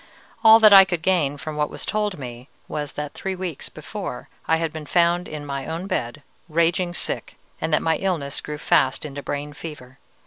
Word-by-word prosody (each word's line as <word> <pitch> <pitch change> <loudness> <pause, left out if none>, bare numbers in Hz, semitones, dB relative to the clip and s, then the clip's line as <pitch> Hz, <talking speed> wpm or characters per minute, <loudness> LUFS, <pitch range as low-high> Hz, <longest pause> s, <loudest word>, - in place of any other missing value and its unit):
All 220 0 +10
that 215 -2 +7
I 195 -1 +11
could 175 -4 -3
gain 155 -7 +2
from 155 +1 -6
what 150 0 +1
was - - -7
told 210 -2 -1
me 125 0 -8 0.2
was 150 -1 -4
that 150 -1 -5
three 190 -1 -4
weeks 180 -5 -5
before 155 -2 -7 0.2
I 160 - +4
had 165 -1 -2
been 155 -2 -7
found 175 +1 +2
in 150 -1 -6
my 140 -1 -4
own 165 +3 -4
bed, 150 - -3 0.3
raging 170 +2 +1
sick, - - -3 0.2
and 160 - -1
that 150 - +2
my 160 -1 +2
illness 165 -8 -2
grew 150 0 -6
fast 135 -1 +2
into 145 -1 -6
brain 145 +1 -4
fever. 140 -4 -10
160 Hz, 200 wpm, -23 LUFS, 145-180 Hz, 0.3 s, I